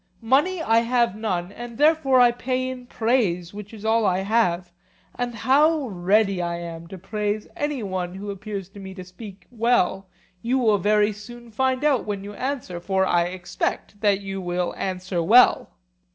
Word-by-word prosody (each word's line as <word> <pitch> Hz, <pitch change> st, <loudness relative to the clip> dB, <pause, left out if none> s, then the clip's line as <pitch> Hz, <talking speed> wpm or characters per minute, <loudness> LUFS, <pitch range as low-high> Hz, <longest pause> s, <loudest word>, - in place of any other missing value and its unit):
Money 300 Hz, +9 st, +2 dB
I 225 Hz, -4 st, +4 dB
have 235 Hz, -3 st, +1 dB
none, 190 Hz, -5 st, -2 dB
and 235 Hz, +1 st, -9 dB
therefore 300 Hz, -4 st, +4 dB
I 245 Hz, -1 st, +6 dB
pay 255 Hz, +1 st, -2 dB
in 255 Hz, -1 st, -7 dB
praise, 210 Hz, -9 st, 0 dB
which 205 Hz, 0 st, -9 dB
is 220 Hz, -1 st, -10 dB
all 225 Hz, +1 st, +3 dB
I 185 Hz, -2 st, +1 dB
have; 185 Hz, -4 st, +1 dB, 0.4 s
and 245 Hz, -1 st, -4 dB
how 285 Hz, +4 st, +3 dB
ready 195 Hz, +1 st, +1 dB
I 170 Hz, 0 st, -2 dB
am 170 Hz, -1 st, -7 dB
to 190 Hz, +2 st, -9 dB
praise 210 Hz, +2 st, -3 dB
any 290 Hz, -5 st, -2 dB
one 185 Hz, -2 st, -3 dB
who 200 Hz, +1 st, -5 dB
appears 200 Hz, -1 st, -6 dB
to 200 Hz, -, -13 dB
me 190 Hz, -1 st, -9 dB
to 185 Hz, -, -8 dB
speak 185 Hz, +2 st, -12 dB
well 220 Hz, -5 st, +1 dB, 0.3 s
you 245 Hz, +3 st, 0 dB
will 220 Hz, -5 st, +3 dB
very 210 Hz, +2 st, +2 dB
soon 235 Hz, +3 st, -12 dB
find 260 Hz, +3 st, 0 dB
out 285 Hz, -5 st, +2 dB
when 200 Hz, -2 st, -4 dB
you 205 Hz, +1 st, -8 dB
answer; 250 Hz, -7 st, -4 dB
for 190 Hz, +2 st, 0 dB
I 175 Hz, -2 st, +2 dB
expect 185 Hz, +3 st, -4 dB
that 205 Hz, -2 st, +2 dB
you 195 Hz, -1 st, -5 dB
will 175 Hz, 0 st, -2 dB
answer 185 Hz, -1 st, -3 dB
well. 230 Hz, +9 st, +5 dB
210 Hz, 180 wpm, -23 LUFS, 185-240 Hz, 0.4 s, I